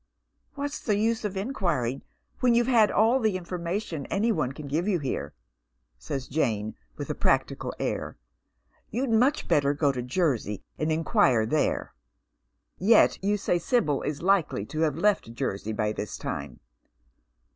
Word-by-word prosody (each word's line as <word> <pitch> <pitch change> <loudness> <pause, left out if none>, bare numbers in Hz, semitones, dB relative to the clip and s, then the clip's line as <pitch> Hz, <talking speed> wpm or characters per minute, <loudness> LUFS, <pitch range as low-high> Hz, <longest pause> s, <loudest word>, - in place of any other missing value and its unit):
" - - -46
What's 285 0 -3
the 210 -4 0
use 225 +2 +1
of 205 -2 -3
inquiring 175 - -1 0.4
when 245 -2 +4
you've 240 0 +4
had 230 -4 +5
all 225 +5 +3
the 215 -6 +1
in 180 - -10
formation 170 -3 -3
any 220 +4 +1
one 150 - 0
can 145 +1 -8
give 160 +7 -1
you 200 -4 +2
here? 135 - -4 0.3
" - - -48
asks 135 -2 -2
Jane, 110 -8 -1 0.2
with - - -4
a - - 0
practical - - 0
air. - - -3 0.7
You'd 250 +2 -1
much 255 +7 +3
better 140 0 +2
go 145 -1 +2
to 125 -2 -4
Jersey 125 - -1 0.2
and 155 +1 0
inquire 130 -7 +3
there." 150 +7 0 0.5
*' - - -50 0.2
Yet 210 0 +4
you 205 +1 +2
say 180 -3 0
Sibyl 160 - +1
is 150 +1 -4
likely 180 - +2
to 155 - -2
have 155 -2 +1
left 185 - +1
Jersey 100 -1 -3
by 105 0 0
this 105 -1 -5
time. - - -5
165 Hz, 165 wpm, -27 LUFS, 130-210 Hz, 0.7 s, had